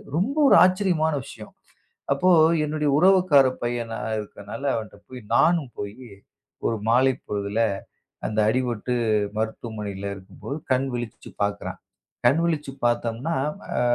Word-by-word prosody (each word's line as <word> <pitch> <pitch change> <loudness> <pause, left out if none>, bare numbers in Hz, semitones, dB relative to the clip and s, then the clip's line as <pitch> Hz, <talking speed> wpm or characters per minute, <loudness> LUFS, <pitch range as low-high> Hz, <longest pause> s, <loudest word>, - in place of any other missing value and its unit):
ரொம்ப 215 - 0
ஒரு - - +7
ஆச்சரியமான 180 -4 +2
விஷயம். 110 -5 -11 0.6
அப்போ 175 +7 +2 0.4
என்னுடைய 150 0 -1
உறவுக்கார 180 -6 +5 0.2
பையனா 120 -1 -2 0.2
இருக்கறனால 105 +4 -8
அவன்ட்ட 110 -2 -6
போய் 125 -2 -9
நானும் 155 -3 +3
போய் 110 +5 -7 0.6
ஒரு 115 - 0
மாலைப் 130 +2 +3
பொழுதுல 105 +2 -1 0.7
அந்த 110 0 -1
அடிபட்டு 125 -1 -1 0.4
மருத்துவமனையில 105 -3 -4
இருக்கும்போது 100 +9 -8
கண் 130 +1 +2
விழிச்சு 120 -2 -6
பாக்குறான். 100 0 -3 0.5
கண் 155 - +4
விழிச்சு 150 -4 -1
பாத்தோம்னா, 120 +6 0 0.4
அ, - - +2
125 Hz, 115 wpm, -24 LUFS, 110-155 Hz, 0.7 s, ஒரு